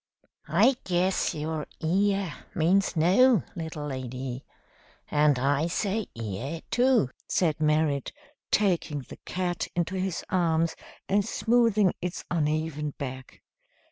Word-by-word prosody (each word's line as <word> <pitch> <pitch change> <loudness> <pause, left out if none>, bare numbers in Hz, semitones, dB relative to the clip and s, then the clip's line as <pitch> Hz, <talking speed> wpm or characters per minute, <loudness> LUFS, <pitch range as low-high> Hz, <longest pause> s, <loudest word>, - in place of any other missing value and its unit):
"I 225 - +4
guess 180 +1 +1
your 155 0 -3
'Iya' 195 +1 +1 0.2
means 185 +5 +2
no, 190 - +5
little 160 -3 -5
lady, 130 -1 -5 0.7
and 150 -2 +4
I 140 +5 +1
say 205 +4 -1
'Iya' 115 +9 -4
too," 245 - +3 0.2
said 160 -5 +1
Merrit, 150 -2 +1 0.4
taking 175 -8 +1
the - - -12
cat 180 -1 -2
into 175 +1 -1
his 185 -2 -2
arms 165 -2 +2 0.3
and 200 +1 +2
smoothing 220 -3 +2
its 180 0 -4
uneven 155 -2 -1
back. 130 -2 -7
165 Hz, 110 wpm, -27 LUFS, 150-190 Hz, 0.7 s, no